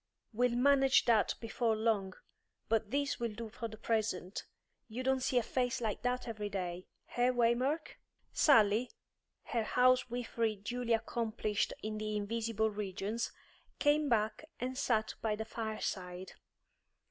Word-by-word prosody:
We'll 245 +2 +2
manage 270 +1 +5
that 225 -4 +3
before 230 0 0
long, 215 -4 0 0.5
but 225 -1 +1
this 280 +3 0
will 235 -2 -2
do 225 +1 -6
for 230 +2 -5
the 220 -1 -10
present. 215 -4 -1 0.4
You 240 +3 -5
don't 265 0 +2
see 255 - +1
a 245 - +4
face 250 +2 0
like 220 -4 -2
that 250 +1 -1
every 210 -2 -4
day; 185 -2 -4 0.3
eh, 245 +1 +4
Waymark?" 255 +5 +1 0.3
Sally, 225 -3 +5 0.5
her 235 - -1
housewifery 245 -2 +2
duly 235 +4 -2
accomplished 220 -2 -1
in 215 0 -3
the 215 0 -2
invisible 220 +1 0
regions, 210 +2 -3 0.5
came 290 0 +3
back 220 +3 +1
and 255 +1 -3
sat 220 -4 +1
by 215 -2 0
the 220 +1 -4
fireside. 190 -5 -4
230 Hz, 135 wpm, -34 LUFS, 215-245 Hz, 0.5 s, manage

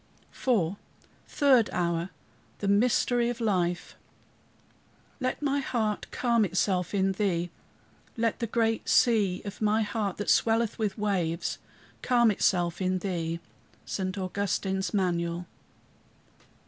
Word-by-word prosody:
IV 200 -8 0 0.5
THIRD 265 -6 +4
HOUR 170 0 -1 0.5
THE 200 - -3
MYSTERY 235 +3 +3
OF 240 0 -4
LIFE 180 -6 0 1.3
"Let 255 +2 -2
my 285 0 +1
heart 220 -6 -1
calm 235 -3 +2
itself 185 0 0
in 195 0 +2
thee. 180 -4 -1 0.7
Let 230 -1 0
the 230 - -1
great 225 0 0
sea 210 -6 +3
of 200 +1 -7
my 215 +1 +2
heart, 205 -2 -2
that 205 - 0
swelleth 225 0 +2
with 215 -1 -1
waves, 185 -6 -1 0.4
calm 240 -3 +4
itself 175 -3 +1
in 185 0 +1
thee." 170 -3 -3 0.4
ST. 185 0 -3
AUGUSTINE'S 190 0 -1
MANUAL. 175 -3 -1
200 Hz, 115 wpm, -28 LUFS, 180-225 Hz, 1.3 s, THIRD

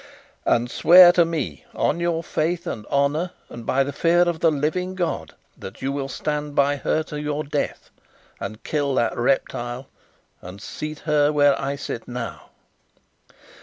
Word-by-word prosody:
"And 120 +1 +2
swear 175 +1 +8
to 175 -1 +4
me, 150 - -4
on 170 - 0
your 170 -1 -1
faith 170 +3 -1
and 110 -10 -5
honour 145 +6 0 0.2
and 120 -1 -10
by 135 +1 +3
the 140 +1 -5
fear 170 +4 +3
of 175 -2 -1
the 165 - +4
living 160 +5 -1
God, 175 -3 -3 0.2
that 95 +3 -10
you 135 - 0
will 140 -1 -3
stand 150 +1 -3
by 140 +1 +3
her 155 +3 0
to 150 - -9
the 150 0 -2
death, 145 0 -3 0.5
and 110 +1 -7
kill 145 -3 -1
that 115 -2 +1
reptile, 120 0 -1 0.5
and 90 +3 -10
seat 150 +9 -6
her 150 -1 +2
where 145 -1 +4
I 140 +1 -2
sit 130 -4 -6
now." 120 -2 -6
145 Hz, 165 wpm, -23 LUFS, 135-165 Hz, 0.5 s, swear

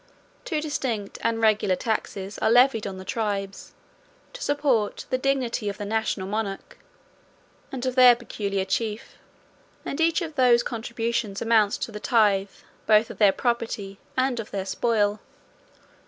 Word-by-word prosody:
Two 315 - -1
distinct 245 -9 -3
and 230 0 0
regular 210 -3 +3
taxes 200 -2 -3
are - - +2
levied 240 -2 +4
on 190 -1 -6
the 185 - -9
tribes, 200 -3 -4 0.6
to - - -10
support 280 - 0
the 255 - +2
dignity 255 -5 0
of 200 - -6
the 205 - -5
national 220 -2 -1
monarch, 200 0 -4 0.9
and 260 -1 -4
of 255 - 0
their 250 -1 +8
peculiar 200 -5 -3
chief; 215 +2 -3 0.7
and 280 - -3
each 330 +2 +2
of 320 -1 -6
those 250 -4 +4
contributions 230 -3 -3
amounts 220 -3 +3
to - - -5
the 210 - -7
tithe, 205 -4 +2 0.4
both 215 +1 +4
of - - -12
their 205 -3 +6
property, 225 -5 -2 0.2
and 255 -2 +1
of 220 - -6
their 195 -1 -4
spoil. 210 0 0
225 Hz, 150 wpm, -25 LUFS, 205-245 Hz, 0.9 s, their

